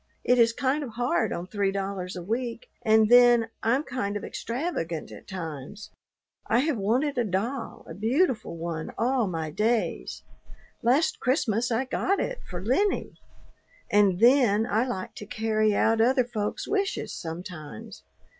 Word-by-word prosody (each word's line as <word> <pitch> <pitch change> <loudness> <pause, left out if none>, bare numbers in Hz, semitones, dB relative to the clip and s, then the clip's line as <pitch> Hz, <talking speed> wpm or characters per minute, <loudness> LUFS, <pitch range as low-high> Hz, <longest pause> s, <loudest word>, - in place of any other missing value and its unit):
It 250 0 +3
is 230 0 +6
kind 270 +5 0
of 240 -5 -7
hard 240 -2 +1
on 170 - -3
three 200 0 -1
dollars 195 -2 -4
a 180 - -6
week, 230 +4 -4
and 220 0 +5
then 240 -1 +6
I'm 250 +6 +2
kind 205 -7 -3
of - - -8
extravagant 230 - -4
at - - -12
times. 165 +1 -7 0.6
I 240 - +3
have 305 0 0
wanted 250 +7 0
a - - +3
doll, 225 +6 -3
a - - -7
beautiful 225 - 0
one, 165 -1 -4
all 245 -2 +1
my 160 -3 -3
days. 220 +6 -1 0.6
Last 265 +8 +2
Christmas 250 -3 +1
I 235 +4 +1
got 385 +9 0
it - - -2
for 180 0 -6
Lennie. 385 - 0 0.7
And 200 -3 +4
then 235 -3 +5
I 230 +2 +1
like 190 -7 -4
to 210 - -8
carry 215 -1 +1
out 225 +1 +3
other 255 +2 +3
folks' 215 -4 -3
wishes 400 -1 -1
sometimes. 160 - -8
225 Hz, 155 wpm, -27 LUFS, 195-250 Hz, 0.7 s, is